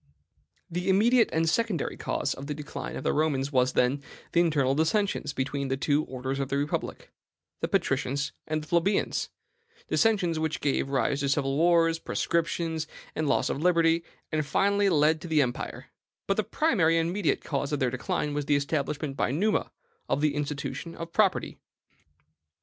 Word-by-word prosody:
The 180 +1 -3
immediate 225 +4 +4
and 165 0 +1
secondary 210 -3 0
cause - - -2
of 140 - -8
the 150 - -3
decline 150 -1 -6
of - - -5
the - - +1
Romans 145 -3 0
was, 130 -2 +2
then, 130 +3 +2 0.3
the 170 - +3
internal 150 -6 +3
dissensions 160 +5 0
between 140 +1 -2
the 135 0 -1
two 145 +2 +1
orders 130 +1 -4
of 135 -1 -2
the 140 - 0
republic, 145 +2 -3 0.5
the - - -1
patricians 140 +2 0 0.2
and 155 0 -1
the - - -12
plebeians, 170 +5 +1 0.6
dissensions 190 -8 +2
which 160 -1 -1
gave 140 -1 0
rise 135 0 +1
to 140 -1 0
civil 135 -1 +1
wars, 165 +1 +3
proscriptions, 165 -1 -1 0.3
and 155 -2 0
loss - - +2
of 140 - -2
liberty, 165 -1 +3 0.3
and 155 -1 +1
finally 200 +7 +2
led 155 -1 +3
to 175 - -7
the 155 -3 +4
empire; 120 -1 -5 0.3
but - - +1
the - - +1
primary 185 - +2
and 165 +1 0
mediate 195 -5 0
cause 140 -1 -2
of 145 - 0
their 125 -2 +1
decline 145 +3 -2
was 145 -1 -2
the 145 - +3
establishment 145 0 -1
by 110 -4 0
Numa 200 - 0 0.4
of 140 - +1
the 150 -1 +2
institution 150 +3 -4
of 165 0 -7
property. 205 -3 +1
155 Hz, 170 wpm, -27 LUFS, 140-170 Hz, 0.6 s, immediate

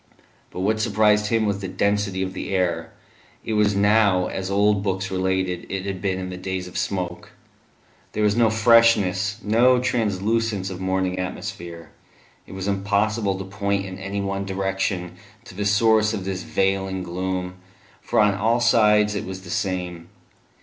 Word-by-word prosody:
But 90 - -6
what 110 +3 +1
surprised 105 -1 +3
him 110 0 +1
was 100 -1 -1
the 95 - -5
density 100 0 0
of 95 0 -4
the 95 - -4
air; 85 -3 -1 0.5
it 110 - -2
was 105 -1 +2
now, 100 -2 +3
as 95 +1 -4
old 100 0 +2
books 95 -1 -2
related 95 -1 -1
it 95 0 -3
had 95 -2 -4
been 95 -2 -1
in 90 0 -5
the 90 - -6
days 95 0 -4
of 90 - -12
smoke. 90 -2 -3 0.8
There 105 - -1
was 105 -1 +3
no 115 -1 +4
freshness, 110 -3 +4
no 120 +4 +4
translucence 110 -4 0
of 95 0 -7
morning 95 -1 -1
atmosphere; 85 -2 -6 0.6
it - - -11
was 95 0 -5
impossible 100 +1 0
to 95 - -6
point 100 0 -2
in 95 0 -8
any 100 +1 -3
one 100 0 -2
direction 95 -2 -2 0.3
to - - -12
the 100 +2 -3
source 110 +1 +3
of 95 -3 -5
this 95 -1 -3
veiling 95 0 -1
gloom, 90 +1 -4 0.4
for - - 0
on 105 -1 +4
all 110 +4 +1
sides 105 -3 +4
it 100 - -3
was 95 0 -7
the 85 - -9
same. 90 -5 -3
95 Hz, 170 wpm, -23 LUFS, 95-105 Hz, 0.8 s, no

